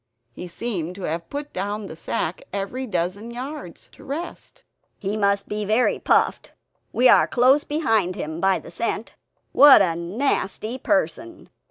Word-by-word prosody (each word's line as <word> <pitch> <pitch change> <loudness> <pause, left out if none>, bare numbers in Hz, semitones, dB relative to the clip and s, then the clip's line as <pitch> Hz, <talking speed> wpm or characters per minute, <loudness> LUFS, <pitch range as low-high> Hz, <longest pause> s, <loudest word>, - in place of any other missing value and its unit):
He 180 - -8
seemed 180 -3 -4
to 195 - -9
have 165 +1 -3
put 290 +1 -6
down 205 +2 -3
the 160 - -8
sack 165 +1 -3
every 205 +7 -4
dozen 185 +3 -2
yards, 255 - -8
to - - -16
rest. 320 +6 -7 0.3
"He 200 0 -3
must 200 -1 +1
be 210 0 -3
very 220 +5 +2
puffed; - - +1 0.4
we 255 - +4
are - - +6
close 260 +4 +4
behind 225 - 0
him, 160 +2 -5
by 190 -1 +3
the 165 - -11
scent. 230 +3 -3 0.4
What 285 -7 +8
a 170 -3 0
nasty 215 +5 -2
person!" 320 +4 -2
210 Hz, 155 wpm, -23 LUFS, 180-260 Hz, 0.4 s, What